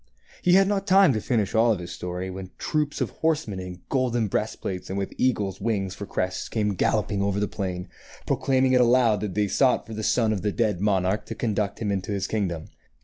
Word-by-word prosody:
He 180 - +4
had 195 +1 +6
not 200 -1 -1
time 190 -5 +6
to 110 - -1
finish 110 -5 0
all 115 0 +4
his 90 -2 -7
story 90 +1 -5
when 95 0 -7
troops 150 -1 -1
of - - -1
horsemen 155 -12 -1
in 90 -1 -8
golden 120 -5 0
breast 105 +3 -2
plates 90 -1 -5
and 95 - -3
with 100 -1 -3
eagles' 105 -7 0
wings 100 -4 -1
for 100 - -7
crests 90 0 -2
came 105 -2 0
galloping 100 +2 0
over 100 0 0
the 105 - 0
plain, 90 -2 -4 0.4
proclaiming 130 -1 +2
it 125 - +5
aloud 120 -3 +4
that 105 -4 -4
they 105 -1 +2
sought 130 +5 +2
for 115 - -8
the 110 - -4
son 110 0 +2
of 100 - -2
the 105 - 0
dead 105 -5 0
monarch 95 0 +1
to - - -5
conduct 105 -3 -1
him 100 -2 0
to 100 - -6
his 100 -1 -1
kingdom. 95 -7 -2
105 Hz, 215 wpm, -25 LUFS, 95-125 Hz, 0.4 s, had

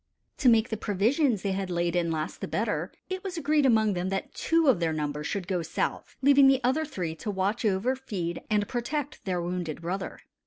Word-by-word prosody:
To 260 - +5
make 230 0 +4
the 220 - -2
provisions 220 - +1
they 200 - 0
had 190 0 -2
laid 175 0 0
in 170 -1 +1
last 160 -1 -3
the - - -3
better, - - -1 0.2
it 375 +1 -4
was 375 -3 -4
agreed 295 -2 +3
among 220 -4 +4
them 180 +1 -2
that 195 0 -3
two 330 -1 +2
of 250 -10 +5
their 165 -2 0
number 150 -1 -2
should 185 +2 -3
go 180 -2 0
south, 160 - -3
leaving 280 0 +7
the 270 -1 +5
other 270 +6 +2
three 180 - -4
to 210 - -5
watch 200 +3 -1
over, 210 +6 +1
feed, 190 -10 -4
and 210 -1 +1
protect 280 +4 -3
their 185 -2 -1
wounded 175 -3 -3
brother. 185 +3 -4
205 Hz, 210 wpm, -28 LUFS, 175-265 Hz, 0.2 s, leaving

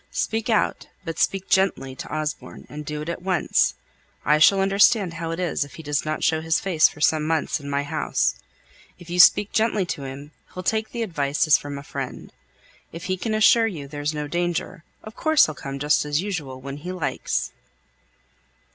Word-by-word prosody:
Speak 225 +1 -2
out, 220 - +1 0.2
but 165 -1 -5
speak 195 -1 0
gently 185 -9 +1
to - - -8
Osborne, 155 0 -5
and 150 +1 -7
do 150 0 -4
it - - -10
at 170 - -4
once. 180 - +1 0.5
I 150 0 +4
shall 195 +5 +6
understand 195 -1 +3
how 165 0 -5
it 165 +1 -4
is 175 -5 0
if 145 - -12
he 160 - -10
doesn't 150 +1 -2
show 160 -1 +2
his 160 0 +1
face 175 -5 +4
for - - -14
some 155 0 +3
months 160 0 0
in 140 -1 -8
my 140 0 0
house. 150 +1 0 0.6
If 175 0 -12
you 180 - -2
speak 200 +2 +7
gently 220 -3 +1
to 140 -5 -5
him, 140 +3 -8 0.2
he'll 185 - -5
take 220 +3 0
the 235 -1 -2
advice 145 -8 0
as 155 -1 +5
from 145 -1 -6
a 140 - -8
friend. - - -7 0.6
If 165 - -8
he 185 - -1
can 215 +4 -2
assure 225 +1 +5
you 155 -10 -6
there's 145 +1 -3
no 150 -1 -4
danger, 175 +1 -2 0.2
of 215 +1 -10
course 315 -1 +4
he'll 155 - -4
come 135 -1 -6
just 150 +2 +2
as 150 0 0
usual, 160 -9 -4
when 135 +1 -7
he 175 +5 -6
likes." 155 -8 -2
160 Hz, 200 wpm, -23 LUFS, 145-190 Hz, 0.6 s, speak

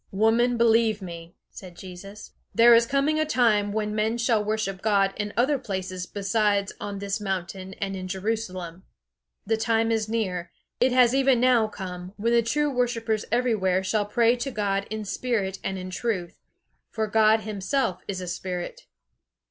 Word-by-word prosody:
"Woman, 230 +4 +2
believe 225 -2 +3
me," 170 -3 -9 0.2
said 180 -3 -11
Jesus, 190 +3 -10 0.2
"there 235 +1 +7
is 230 0 +5
coming 280 +4 +1
a - - +3
time 220 -8 +2
when 210 0 -2
men 220 +2 0
shall 230 -3 +2
worship 210 -3 -2
God 200 -2 +2
in 205 -1 -3
other 265 +4 +2
places 185 -5 -4
besides 205 -1 0
on 205 -1 -5
this 200 +1 -3
mountain 190 -1 -4
and 195 -1 -3
in 185 -1 -5
Jerusalem. 185 -3 -4 0.6
The 225 +1 +1
time 225 0 +1
is 220 -1 0
near; 185 -6 -2 0.3
it 255 +1 +3
has 250 -1 +5
even 270 -2 +3
now 245 -3 +4
come, 185 -3 -7
when 230 +3 0
the 235 - +5
true 290 +6 0
worshippers 230 -4 -1
everywhere 215 -6 +1
shall 205 +2 0
pray 235 +2 +3
to 250 +3 -3
God 200 -4 -1
in 215 0 -4
spirit 195 -2 -2
and 190 - -2
in 185 0 -6
truth; 185 -4 -3 0.5
for 220 -1 -2
God 220 +1 +4
himself 210 -1 -2
is 190 -2 -4
a 180 - -6
Spirit." 180 - -5
215 Hz, 165 wpm, -25 LUFS, 190-235 Hz, 0.6 s, there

